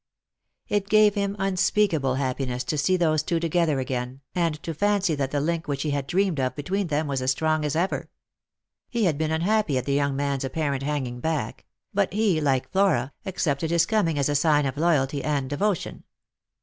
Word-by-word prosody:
It 205 -1 -1
gave 215 -1 +5
him 200 -1 -1
unspeakable 185 -7 +1
happiness 130 -2 -2
to 150 - -2
see 185 +6 +2
those 155 -3 +2
two 170 +1 -1
together 165 -3 +1
again, 130 0 -4
and 170 -3 0
to 165 - -3
fancy 200 +1 +1
that 140 -3 -1
the 145 - -1
link 165 +3 -1
which 140 -1 -2
he 150 - -1
had 140 -1 -2
dreamed 185 -4 +1
of 130 -1 -1
between 185 +7 -2
them 155 0 0
was 140 -2 -2
as 130 - 0
strong 155 +3 +1
as 150 -1 -1
ever. 175 +4 -1 0.8
He 235 -2 -1
had 160 -6 +1
been 155 -1 0
unhappy 170 -1 +1
at 130 - -2
the 140 - 0
young 140 -1 +1
man's 140 -1 -1
apparent 140 0 -2
hanging 135 -4 -3
back; 160 +2 -3 0.3
but 200 -1 +1
he, 200 -6 +2
like 135 -3 0
Flora, 185 -10 +2
accepted 160 -4 -1
his 170 0 +3
coming 190 -9 +1
as 140 - +1
a 145 - 0
sign 145 0 +3
of 135 0 -2
loyalty 145 -3 +1
and 145 -3 -1
devotion. 175 +7 -2
155 Hz, 195 wpm, -25 LUFS, 140-180 Hz, 0.8 s, gave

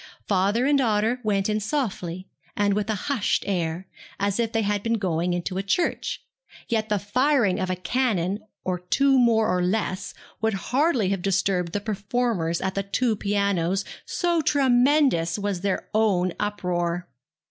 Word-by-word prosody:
Father 200 +5 +2
and 285 0 +3
daughter 225 0 +1
went 200 -2 +1
in 215 0 0
softly, 195 - -3 0.3
and 205 -1 +2
with 210 +1 -1
a 220 - +1
hushed 275 -8 0
air, 175 -2 -2 0.3
as 200 +2 0
if 230 -1 0
they 225 -2 0
had 205 0 0
been 230 +2 0
going 180 -4 -1
into 175 +2 -2
church; 210 - -1 0.4
yet 220 -1 -1
the 210 - +2
firing 240 0 +2
of 185 -1 -2
a 185 - 0
cannon 200 -2 0 0.2
or 180 -1 -2
two 270 +9 +3
more 230 -3 +4
or 180 0 +1
less 185 0 -1 0.3
would 220 -2 +1
hardly 250 - +1
have 195 -2 -1
disturbed 185 -2 0
the 205 - -1
performers 205 -4 -1
at 190 0 -1
the 195 - -1
two 220 +4 0
pianos, 200 -2 0 0.2
so 345 -2 0
tremendous 260 - +3
was 200 -3 -2
their 195 -1 -1
own 190 -5 +2
uproar. 180 -4 -2
205 Hz, 160 wpm, -25 LUFS, 185-230 Hz, 0.4 s, more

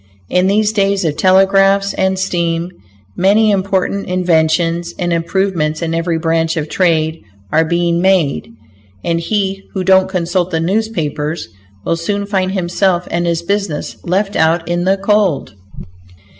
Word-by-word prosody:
In 180 +1 +2
these 210 +2 +2
days 200 -3 +1
of 150 -2 0
telegraphs 195 +1 +3
and 190 0 0
steam, 170 -2 -1 0.4
many 210 +3 +3
important 195 0 -1
inventions 170 -1 +1
and 175 -1 -1
improvements 170 -2 -1
in 165 0 -2
every 165 0 -1
branch 165 0 0
of 155 -1 -3
trade 160 -3 +1 0.3
are 160 - +3
being 170 +1 0
made, 185 -6 +1 0.5
and 170 0 0
he 195 +1 -2
who 190 - -1
don't 190 0 +4
consult 175 -1 -1
the 165 - -1
newspapers 165 -5 -2 0.4
will 165 - +1
soon 200 +4 -2
find 190 -2 -1
himself 180 -1 0
and 175 0 -1
his 170 0 -1
business 200 -5 -2
left 195 +3 -1
out 165 +1 +2
in 175 +1 -1
the 190 +1 +2
cold. 195 - 0
180 Hz, 145 wpm, -15 LUFS, 165-195 Hz, 0.5 s, don't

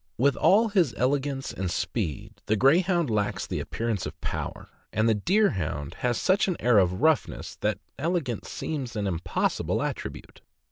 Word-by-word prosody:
With 135 +2 +3
all 220 +4 +4
his 180 - +2
elegance 135 +1 0
and 95 -1 -3
speed, 85 - -3
the 110 - +3
Greyhound 170 - +3
lacks 105 -1 0
the - - -3
appearance 115 -4 -2
of - - -9
power; - - -5 0.2
and 110 +2 +2
the 115 - +5
Deerhound 100 - 0
has 120 -2 0
such 190 +1 +3
an 185 - -1
air 120 -4 +5
of 90 -1 +1
joughness 155 0 +1
that - - 0 0.2
elegance 155 - -2
seems 135 -7 -4
an 105 -1 -1
impossible 85 -2 -1
attribute. - - -6
125 Hz, 155 wpm, -27 LUFS, 105-160 Hz, 0.2 s, the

